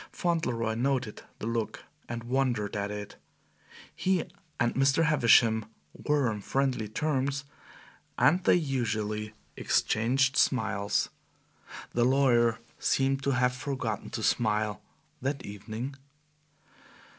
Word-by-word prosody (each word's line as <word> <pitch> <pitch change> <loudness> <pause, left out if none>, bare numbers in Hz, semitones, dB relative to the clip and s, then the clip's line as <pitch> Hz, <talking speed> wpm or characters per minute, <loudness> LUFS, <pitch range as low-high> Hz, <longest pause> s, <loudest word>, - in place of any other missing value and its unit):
Fauntleroy 125 -11 -1
noted 125 -1 -1 0.2
the - - -6
look 115 -1 -2 0.3
and 120 0 -4
wondered 120 -4 0
at 100 0 -2
it. 105 0 -7 0.8
He 185 -3 +1 0.4
and 120 -1 +2
Mr. 135 +4 +3
Havisham 115 -7 +4 0.3
were 145 -3 +1
on 105 -2 -2
friendly 130 -1 0
terms, 140 +3 -1 0.7
and 175 +4 +4
they - - +5
usually 110 -8 -2 0.2
exchanged 130 +5 +1
smiles. 105 -5 +1 0.8
The 120 - +1
lawyer 120 -3 +3 0.2
seemed 135 0 +1
to 140 - 0
have 125 0 +2
forgotten 125 -5 -3
to - - -5
smile 105 -2 +1 0.4
that 140 +2 -2
evening. 110 +6 -6
120 Hz, 110 wpm, -29 LUFS, 110-135 Hz, 0.8 s, they